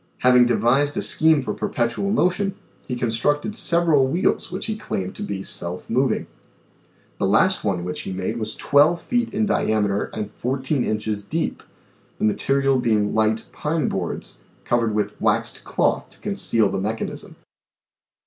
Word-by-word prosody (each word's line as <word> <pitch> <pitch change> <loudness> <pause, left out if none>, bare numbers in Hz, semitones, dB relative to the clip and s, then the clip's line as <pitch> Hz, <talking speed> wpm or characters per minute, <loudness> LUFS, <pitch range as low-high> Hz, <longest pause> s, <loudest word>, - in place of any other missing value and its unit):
Having 125 -1 +6
devised 135 +5 +2
a - - +1
scheme 155 -3 +4
for - - -3
perpetual 120 +11 -1
motion 195 -1 +1 0.3
he 125 - -2
con 120 -1 -1
structed 145 - 0
several 170 - +3
wheels 170 +6 0
which 185 - -4
he 220 - -2
claimed.to 95 - -5
be 95 -1 -4
self 85 -1 -2
moving. 125 +1 +1 0.9
The - - +1
last - - +3
one 95 -4 -1
which 90 0 -4
he 95 - -6
made 95 +5 -3
was 110 -1 -4
1 145 +4 +5
2 - - -9
feet 240 +7 -1
in 215 +2 0
diameter 105 - +1
and 105 -1 -5
14 130 +3 -1
inches 110 -1 -2
deep, 160 +10 -3 0.6
the - - 0
material 135 +5 +2
being 110 -4 +1
light 110 0 +1
pine 155 +1 -1
boards, 90 -3 -4 0.3
covered 115 -3 +1
with 105 - -2
waxed - - 0
cloth - - 0
to - - -20
conceal 110 -2 +1
the - - -2
mechanism. 110 +3 -4
120 Hz, 160 wpm, -22 LUFS, 105-150 Hz, 0.9 s, Having